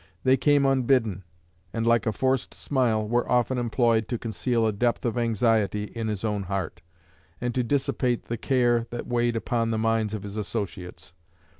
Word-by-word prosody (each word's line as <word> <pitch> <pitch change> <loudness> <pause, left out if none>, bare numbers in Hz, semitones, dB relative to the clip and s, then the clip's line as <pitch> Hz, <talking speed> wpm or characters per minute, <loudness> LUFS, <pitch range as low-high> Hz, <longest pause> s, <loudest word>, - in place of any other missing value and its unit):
They 130 0 +5
came 140 +2 +3
unbidden, 125 -8 +2 0.5
and, 115 0 -1
like 115 0 +3
a - - +3
forced 130 +4 -1
smile, 115 -6 0
were 120 +2 0
often 125 +1 +2
employed 115 -2 +1
to 120 - -2
conceal 115 +1 -1
a 110 - +1
depth 120 +4 0
of 120 - 0
anxiety 115 -3 +1
in 110 +1 -5
his 105 -2 -3
own 105 -2 -1
heart, 95 -2 -4 0.6
and 120 0 -2
to 125 - +1
dissipate 125 -2 0
the 115 - -3
care 120 -2 +1
that 120 - -5
weighed 120 -1 0
upon 115 0 -1
the 110 - 0
minds 110 -1 0
of 105 - -6
his 100 +1 -7
associates. 95 -4 -5
115 Hz, 175 wpm, -26 LUFS, 110-120 Hz, 0.6 s, They